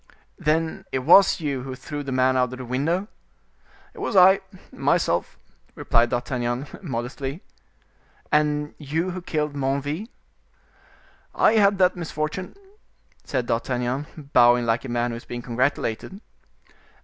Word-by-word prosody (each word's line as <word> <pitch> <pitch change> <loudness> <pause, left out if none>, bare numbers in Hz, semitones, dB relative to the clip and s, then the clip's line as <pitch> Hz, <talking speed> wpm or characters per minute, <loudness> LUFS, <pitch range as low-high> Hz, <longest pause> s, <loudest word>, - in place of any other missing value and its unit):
"Then 160 +1 0
it 130 - -2
was 190 +4 +7
you 140 -5 -2
who 130 0 -6
threw 145 +3 -6
the 140 -1 -5
man 130 0 +2
out 125 -1 +1
of - - -6
the 130 - -7
window?" 155 - -1 0.9
"It - - -13
was - - -3
I, 190 +1 +7 0.3
myself," - - 0 0.4
replied 115 +1 +2
D'Artagnan, 120 +1 -2 0.2
modestly. 135 +1 -5 0.9
"And 150 0 +1
you 160 +5 -2
who 185 +1 -6
killed 150 -3 -2
Menneville?" 145 +7 -2 1.3
"I - - +4
had 200 -2 +4
that 185 -1 +3
misfortune," 165 +1 -4 0.7
said 130 -3 -2
D'Artagnan, 130 +5 -3
bowing 120 0 +5
like 115 +1 +1
a - - -6
man 120 0 0
who 115 - -4
is 115 - -12
being 120 0 -6
congratulated. 125 - -2
140 Hz, 135 wpm, -24 LUFS, 125-160 Hz, 1.3 s, was